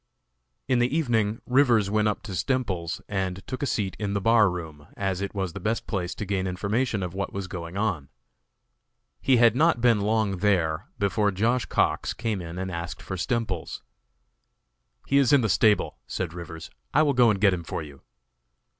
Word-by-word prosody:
In 130 -2 +2
the 125 +6 +1
evening 115 -7 0
Rivers 125 -6 +3
went 110 0 +2
up 105 - -2
to 105 - -7
Stemples's 95 - -1
and 95 -2 -3
took 130 - -5
a 140 - 0
seat 100 -6 -1
in 100 -2 -2
the - - +1
bar 110 0 +4
room, 80 -4 -7
as 95 -1 -1
it 100 +1 -4
was 95 -4 -2
the - - -6
best 110 +2 -1
place 90 -5 -3
to 105 - -4
gain 95 -1 -1
information 105 +4 -1
of 90 -1 -4
what 100 0 -4
was 100 -1 -3
going 85 0 -6
on. 95 -10 -1 1.1
He 130 - +4
had 120 0 +5
not 155 -1 +3
been 115 -3 +3
long 105 -2 +1
there 90 -1 +1
before 105 0 +1
Josh. 115 +6 +1
Cox - - 0
came 110 -4 -2
in 85 0 -7
and 95 0 -3
asked 85 0 -5
for 95 - -5
Stemples. 100 -3 -3 1.2
"He 140 - +3
is 135 -4 +3
in 140 -2 +6
the 110 - 0
stable," 105 +2 +2
said 90 -3 -3
Rivers; 85 -2 -8 0.2
"I - - +6
will 145 -2 +2
go 125 -2 +5
and 100 -3 +1
get 100 -2 +4
him 85 -2 -3
for 80 - -4
you." 70 -3 -12
100 Hz, 190 wpm, -26 LUFS, 90-115 Hz, 1.2 s, in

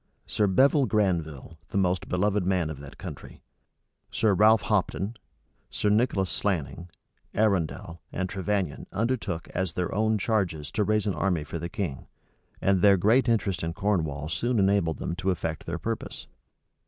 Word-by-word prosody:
Sir 105 - +1
Bevil 135 - +4
Granville, 85 - -1
the - - -2
most 90 -1 +1
beloved 100 +2 +1
man 90 -4 0
of 70 - -8
that 70 -2 -11
country, - - -9 0.7
Sir 110 -3 +2
Ralph 105 +2 +5
Hopton, 100 0 0 0.6
Sir 105 - 0
Nicholas 105 -3 +2
Slanning, 85 -2 -2 0.5
Arundel, 90 -5 0
and 95 - -2
Trevannion 95 -6 -2
undertook 105 -6 -2
as 95 -3 -2
their 90 0 -2
own 110 +1 +2
charges 95 -9 -1
to 105 - +1
raise 105 +1 +1
an 100 - 0
army 90 -4 0
for 80 +3 -6
the 85 +2 -4
king; 90 -11 -4 0.5
and 95 -2 +2
their 100 0 +6
great 115 +7 +3
interest 105 -5 +1
in 80 0 -2
Cornwall 80 -7 -1
soon 120 +9 -1
enabled 95 -5 +2
them 85 - -3
to 95 0 -1
effect 80 -3 -3
their 85 +1 -2
purpose. 115 +6 -4
95 Hz, 155 wpm, -27 LUFS, 85-105 Hz, 0.7 s, their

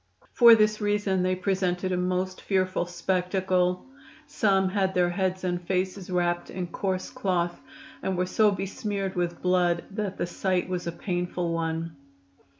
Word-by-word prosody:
For 235 -2 +9
this 215 0 +2
reason 205 -2 +1
they 185 0 +1
presented 185 -1 -1
a - - +1
most 185 +1 -1
fearful 185 -2 0
spectacle. 180 0 0 0.4
Some 200 -9 +2
had 190 -1 0
their 175 -1 +3
heads 185 0 -1
and 175 -1 -1
faces 185 +1 -2
wrapped 175 -1 0
in 185 -1 -4
coarse 185 +1 -3
cloth, 175 -3 -1 0.4
and 190 -1 -2
were 180 - +1
so 210 +3 +3
besmeared 195 0 -3
with 175 -1 -2
blood 180 -2 +2
that 200 -1 -3
the - - -1
sight 180 +1 -1
was 180 -2 -3
a - - -1
painful 175 -1 -2
one. 165 -1 -2
185 Hz, 150 wpm, -27 LUFS, 175-195 Hz, 0.4 s, For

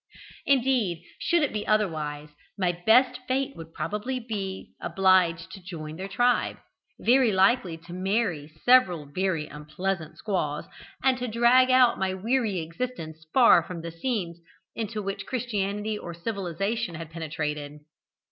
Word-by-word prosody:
Indeed, 245 - +2 0.2
should 340 -2 +2
it 290 - 0
be 210 -1 -3
otherwise, 155 -8 0 0.3
my 185 -3 +2
best 245 +8 +3
fate 270 +1 -1
would 165 0 -10
probably 230 +9 -3
be 230 - -13
to - - -27
be 195 -3 -4 0.2
obliged 185 -2 +3
to 195 - -10
join 155 -4 -7
their 190 +3 -5
tribe, 245 +4 +1 0.4
very 250 -1 +4
likely 190 -2 +3
to 170 +2 -12
marry 185 -5 -1 0.2
several 190 -12 +5
very 165 +1 -1
unpleasant 155 +2 -4
squaws, 155 -8 -2 0.4
and 260 -1 +3
to 250 - -2
drag 240 +3 +5
out 255 -2 +5
my 190 0 0
weary 215 -2 0
existence 160 -3 -6
far 245 -8 +7
away 170 - -7
from 170 -2 -6
scenes 170 -2 -3 0.4
into 220 -1 -3
which 195 0 -4
christianity 210 -3 -2
or 170 -1 -7
civilisation 195 +1 -3
had 165 -1 -8
penetrated. 150 -2 -4
190 Hz, 145 wpm, -27 LUFS, 165-235 Hz, 0.4 s, far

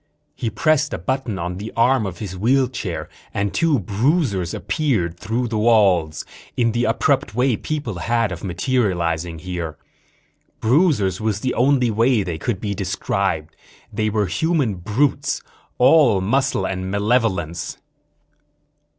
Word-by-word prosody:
He 115 - -3
pressed 150 +8 +1
a - - -4
button 130 -6 -2
on 90 +1 -4
the 105 +3 -6
arm 120 -2 +3
of 90 -3 -6
his 95 -2 -6
wheelchair 120 -3 0 0.3
and 100 0 -1
two 165 -4 +2
bruisers 105 - 0
appeared 115 - -1
through 120 +3 -1
the 110 -2 -2
walls, 95 -9 +3 0.3
in 115 -2 +2
the 120 +2 0
abrupt 115 -2 +1
way 125 0 +2
people 125 - -4
had 115 -1 0
of 85 -1 -6
materializing 85 -5 -1
here. 85 -2 -5 0.8
Bruisers 115 - +2
was 110 -1 -1
the 130 - -1
only 125 -2 +3
way 115 0 +2
they 85 -4 -4
could 100 +2 -2
be 100 -1 -2
described. 95 -3 -2 0.4
They 110 0 0
were 105 -1 +1
human 145 - 0
brutes, 130 +9 0 0.3
all 125 -6 +5
muscle 120 +1 +1
and 95 0 -3
malevolence. 100 -5 0
110 Hz, 135 wpm, -21 LUFS, 95-130 Hz, 0.8 s, all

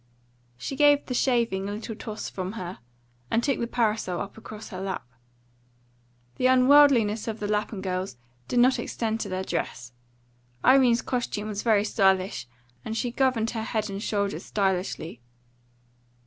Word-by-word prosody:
She 200 - -5
gave 290 0 +5
the 255 - -4
shaving 235 -7 +1
a - - -3
little 220 +1 -6
toss 215 0 -6
from 185 +1 -5
her, 185 -4 -6 0.5
and 230 - +1
took 275 0 +1
the 235 - -1
parasol 215 -7 0
up 200 - -6
across 220 -1 -10
her 185 -1 -6
lap. 190 -7 -4 1.3
The 255 - +3
unworldliness 255 -5 +5
of 220 -1 -3
the 205 - -2
Lapham 210 -1 -1
girls 185 -6 -3 0.3
did 245 - -2
not 255 +2 +5
extend 225 -1 -2
to 205 - -4
their 185 0 -2
dress; 120 -8 -4 0.7
Irene's 255 -3 +5
costume 215 -4 -2
was 205 -1 -3
very 215 -3 +3
stylish, 190 - +1 0.4
and 220 +7 -4
she 245 +1 -1
governed 245 -3 +1
her 225 - -3
head 215 -2 -2
and 195 +1 -5
shoulders 200 -2 -2
stylishly. 185 - -2
215 Hz, 155 wpm, -26 LUFS, 195-240 Hz, 1.3 s, gave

